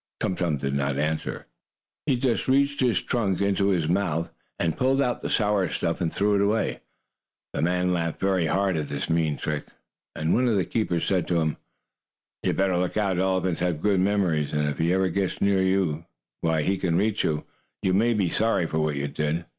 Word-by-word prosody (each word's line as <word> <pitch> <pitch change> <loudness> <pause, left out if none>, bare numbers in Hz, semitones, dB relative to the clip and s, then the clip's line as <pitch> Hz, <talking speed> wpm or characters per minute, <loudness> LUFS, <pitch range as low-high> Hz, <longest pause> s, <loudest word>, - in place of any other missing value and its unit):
Tum 95 - -1
Tum 85 -5 0
did 70 0 -3
not 70 0 0
answer. 80 +2 -2 0.6
He 135 - +3
just 120 -2 0
reached 140 +2 +2
his 125 -4 +2
trunk 105 -7 0
in 100 0 +2
his 95 -5 +1
mouth, 85 -2 0 0.3
and 80 -2 0
pulled 135 +1 +2
out 125 -3 0
the - - -3
sour 105 -4 +1
stuff, 85 - -2
and 85 -2 0
threw 105 +2 +1
it 100 - +3
away. 105 +2 +1 0.7
The - - -2
man 90 +2 +1
laughed 85 -2 -2
very 95 -4 +1
hard 95 +1 +1
at 75 -2 -2
his 70 +3 -3
mean 80 -3 +1
trick, 75 -1 -3 0.5
and 80 +2 0
one 125 +1 +3
of 115 - +2
the 95 -3 +1
keepers 90 -6 -1
said 95 -3 0
to 85 -2 +1
him: 80 -1 0 0.8
"You - - -3
had - - -1
better 95 -2 +2
look 90 +3 -1
out. 95 -4 +1
Elephants 95 -2 0
have 90 -4 0
good 100 -2 +3
memories, 90 -7 +1
and 75 0 +1
if 75 +2 -2
ever 90 +3 +2
you 90 - -1
get 95 +1 -1
near 100 -1 +2
Tum 95 -2 +2
Tum, 80 +3 -7 0.3
where 80 -1 +1
he 95 +5 0
can 85 -3 0
reach 105 +2 +1
you, 75 -1 -1 0.4
you 95 - +2
may 115 +4 +3
be 100 -4 +1
sorry 110 0 +1
for 80 -1 -2
what 75 -1 0
you 70 0 -2
did." 75 +3 -2
90 Hz, 215 wpm, -25 LUFS, 80-100 Hz, 0.8 s, He